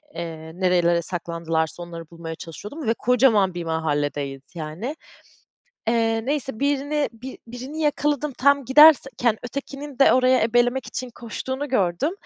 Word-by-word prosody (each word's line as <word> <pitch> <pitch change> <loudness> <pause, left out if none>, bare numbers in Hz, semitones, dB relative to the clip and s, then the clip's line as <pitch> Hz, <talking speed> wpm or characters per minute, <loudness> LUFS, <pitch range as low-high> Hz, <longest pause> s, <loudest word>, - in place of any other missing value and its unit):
eee, 160 -1 -6
nerelere 175 -2 +2
saklandılarsa 165 -1 -2
onları 165 -2 -9
bulmaya 165 -1 -7
çalışıyordum 210 - -8
ve 225 - +3
kocaman 230 -6 +3
bir 175 -1 -4
mahalledeyiz 145 -4 -2
yani. 170 - -5 0.9
Eee, 225 -1 +1
neyse 270 -4 -2
birini 285 +1 0
bi 250 +3 -9
birini 255 +6 -7
yakaladım, 295 -1 0
tam 280 +1 +4
giderken 265 -5 +5
ötekinin 275 +2 -7
de 275 - +6
orayı 255 0 +4
ebelemek 240 +3 +2
için 255 -1 -5
koştuğunu 260 +5 -5
gördüm, 210 - +1
230 Hz, 125 wpm, -23 LUFS, 170-270 Hz, 0.9 s, de